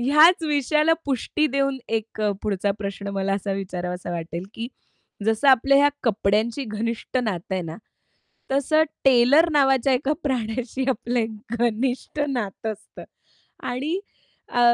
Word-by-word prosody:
ह्याच 305 +7 +6
विषयाला 300 +1 +2
पुष्टी 285 +3 0
देऊन 275 0 0
एक 225 -1 -3
अ, 210 -1 +2
पुढचा 200 -1 0
प्रश्न 200 0 -5
मला 195 0 0
असा 200 0 -2
विचारावासा 180 -2 -4
वाटेल 170 +1 -5
की 230 +1 -4 0.6
जसं 225 +5 +2
आपल्या 270 +2 +5
ह्या 290 0 +6
कपड्यांची 220 +3 +1
घनिष्ठ 230 +3 -3
नातं 190 -4 -3
आहे 185 - -1
ना, 160 0 -7 0.8
तसं 285 +3 +3 0.2
टेलर 270 +6 +6
नावाच्या 270 -3 +3
एका 275 +3 +1
प्राण्याशी 255 0 -2
आपलं 245 0 -1
एक 225 -1 0 0.3
घनिष्ठ 245 +5 -1
नातं 225 -4 -3
असतं. 215 +1 -14 0.6
आणि 290 +9 -2 0.5
अ, 245 - -2
240 Hz, 135 wpm, -24 LUFS, 205-275 Hz, 0.8 s, ह्याच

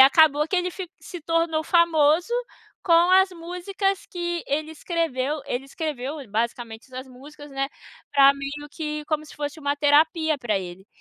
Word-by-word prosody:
acabou 300 +2 +6
que 370 - 0
ele 360 0 0
fi 365 -1 -7
se 350 - -9
tornou 330 -1 +1
famoso 335 +3 +3 0.5
com 345 0 +5
as 380 0 +6
músicas 360 +3 -3
que 345 -1 -3
ele 305 +3 -1
escreveu. 305 -4 -2
Ele 260 0 -3
escreveu, 290 0 -4
ele 240 -7 -12
basicamente 230 +1 -3
essas 260 0 -8
músicas, 290 +3 -13
né, 275 0 -2 0.4
pra 275 -1 +7
amigo 280 +1 -5
que 300 -1 -4
como 310 -1 -1
se - - -13
fosse 295 +1 -4
uma 285 0 -1
terapia 310 +1 +3
pra 215 -6 0
ele. 185 +1 -9
300 Hz, 165 wpm, -24 LUFS, 275-335 Hz, 0.5 s, pra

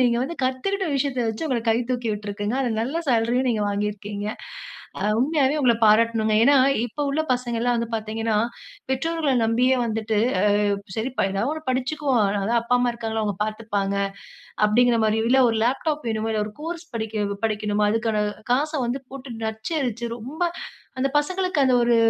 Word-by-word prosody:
நீங்க 240 -1 +3
வந்து 335 - -5
கத்துக்கிட்ட 380 +10 -1
விஷயத்த 270 -1 -1
வச்சு 260 +9 -4
உங்கள 245 -3 0
கை 225 - +3
தூக்கி 245 -2 -1
விட்ருக்குங்க. 205 +1 -4
அதுல 240 -3 0
நல்ல 270 +8 -3
சேலரியும் 240 +2 +2
நீங்க 215 - -1
வாங்கியிருக்கீங்க. 205 0 -3 0.7
அ - - -1
உண்மையாவே 280 +2 +2
உங்கள 240 -3 +4
பாராட்டணுங்க. 220 0 +4
ஏன்னா 285 +3 +6 0.3
இப்ப 245 +5 -4
உள்ள 295 - 0
பசங்கள்லாம் 245 -1 0
வந்து 235 0 -2
பார்த்தீங்கன்னா, 220 0 -1 0.5
பெற்றோர்கள 310 +2 0
நம்பியே 250 +4 +3
வந்துட்டு, 220 -1 -1 0.4
"அ - - +2 0.3
சரி 225 +4 -1
ப - - +3
ஏதாவது 200 +8 -1
ஒண்ணு 315 0 -7
படிச்சுகுவோம். 260 +1 0
அ - - +2 0.2
அதான் 235 +3 +2
அப்பா, 245 +1 +2
அம்மா 245 0 +2
இருக்காங்கல்ல. 225 -2 -3
அவுங்க 205 -3 -2
பார்த்துப்பாங்க." 210 -2 -2 0.7
அப்படீங்ற 235 +2 +3
மாரியோ, 220 +1 +1
இல்ல 265 +1 +5
ஒரு 225 - -1
லேப்டாப் 290 +5 0
வேணுமா? 220 0 -1
இல்ல 215 -1 0
ஒரு 215 - -9
கோர்ஸ் 335 +1 -5
படிக்க 220 -2 -2 0.2
படிக்கணுமா? 210 -1 +1
அதுக்கான 220 -2 0 0.3
காச 295 +5 +1
வந்து 255 +3 -2
போட்டு 265 -4 -8
நச்சரிச்சு, 235 0 -2
ரொம்ப 270 +9 -6 0.6
அந்த 270 +1 +1
பசங்களுக்கு 365 +2 -2
அது 255 - +3
ஒரு 235 -1 +4
235 Hz, 165 wpm, -23 LUFS, 220-265 Hz, 0.7 s, ஏன்னா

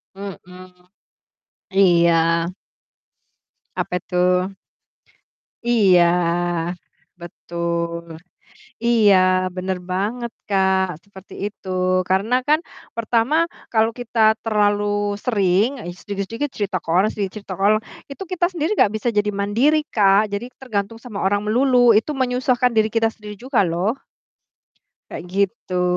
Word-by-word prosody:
Mhm. 185 -2 -10 1.0
Iya. 170 -3 +5 1.6
Apa 180 - -2
tuh? 180 +1 +1 1.2
Iya. 195 -7 +5 1.2
Betul. 170 -1 -4 0.7
Iya, 220 -4 +5 0.4
bener 185 0 -2
banget 225 +6 -2 0.2
Kak, 190 -1 +2 0.2
seperti 195 -1 -15
itu. 205 -2 -8 0.4
Karena 200 +6 +2
kan 305 +1 +5 0.4
pertama, 230 +4 +1 0.4
kalau 225 0 +3
kita 240 -1 -4 0.2
terlalu 205 -2 +1 0.4
sering, 200 -2 +2 0.2
ih 175 - -6
sedikit-sedikit 205 +8 -4
cerita 200 -3 -1
ke - - -11
orang, 185 +6 +3
sedikit 195 -3 -3
cerita 200 -2 -7
orang, 210 +2 +4 0.3
itu 275 +8 -7
kita 360 -1 +1
sendiri 335 -2 -2
gak 205 - +3
bisa 230 +2 -2
jadi 210 0 +2
mandiri 210 +10 +2
Kak, 200 0 +4
jadi 200 +4 -3 0.2
tergantung 220 -3 -3
sama 230 -3 -7
orang 200 +1 +2
melulu, 245 +1 +4
itu 220 +8 +2
menyusahkan 250 -1 +1
diri 220 -1 +2
kita 225 0 0
sendiri 210 -1 -10
juga 255 +2 0
loh. 180 +7 0 1.2
Kayak - - -7
gitu. 185 -2 -1
205 Hz, 115 wpm, -21 LUFS, 190-230 Hz, 1.6 s, Iya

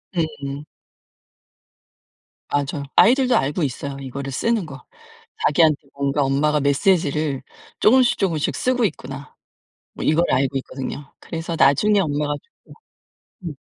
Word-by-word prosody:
음음. 150 -4 -3 1.9
맞아요. 145 0 -1
아이들도 255 +1 +5
알고 145 +5 -1
있어요, 140 +1 -4
이거를 135 +1 -6
쓰는 225 - 0
거. 135 -4 -11 0.6
자기한테 155 0 +4 0.2
뭔가 140 +1 0
엄마가 150 +3 +1
메시지를 145 -1 +1 0.4
쪼금씩 250 +2 +4
쪼금씩 165 -7 0
쓰고 250 -2 +1
있구나. 135 -6 -6 0.6
뭐 - - -6
이걸 160 +3 +3
알고 135 0 +1
있거든요. 135 +2 -7
그래서 165 0 -5
나중에 205 +10 +4
엄마가 145 -3 0
죽고 465 - -21 0.7
음. 155 - -4
150 Hz, 285 characters per minute, -21 LUFS, 140-175 Hz, 1.9 s, 아이들도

